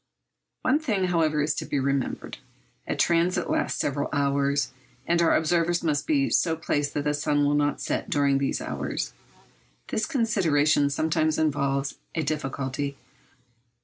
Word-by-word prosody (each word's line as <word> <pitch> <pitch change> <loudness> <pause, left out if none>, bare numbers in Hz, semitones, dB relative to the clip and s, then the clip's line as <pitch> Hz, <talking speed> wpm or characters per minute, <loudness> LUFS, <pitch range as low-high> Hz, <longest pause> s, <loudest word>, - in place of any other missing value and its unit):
One 285 +4 +3
thing, 220 -11 -1
however, 155 -4 +2
is 150 0 +1
to - - -4
be 145 - -2
remembered. 140 -1 -2 0.5
A - - -1
transit 170 +1 +1
lasts - - 0
several 145 0 -1
hours, 140 0 +1 0.3
and 170 0 +2
our 170 - +4
observers 170 +2 +1
must 150 -3 0
be 285 -3 +2
so 165 -2 +2
placed 145 -2 -2
that 145 - 0
the 150 0 +1
sun 145 0 +1
will 145 - +2
not 145 -1 +1
set - - -2
during 140 -1 +2
these 140 - -1
hours. - - -3 0.8
This 215 - -1
consideration 165 - +2
sometimes 155 +2 +1
involves 140 -2 0 0.2
a 160 - 0
difficulty. 140 -1 -3
150 Hz, 145 wpm, -26 LUFS, 140-170 Hz, 0.8 s, our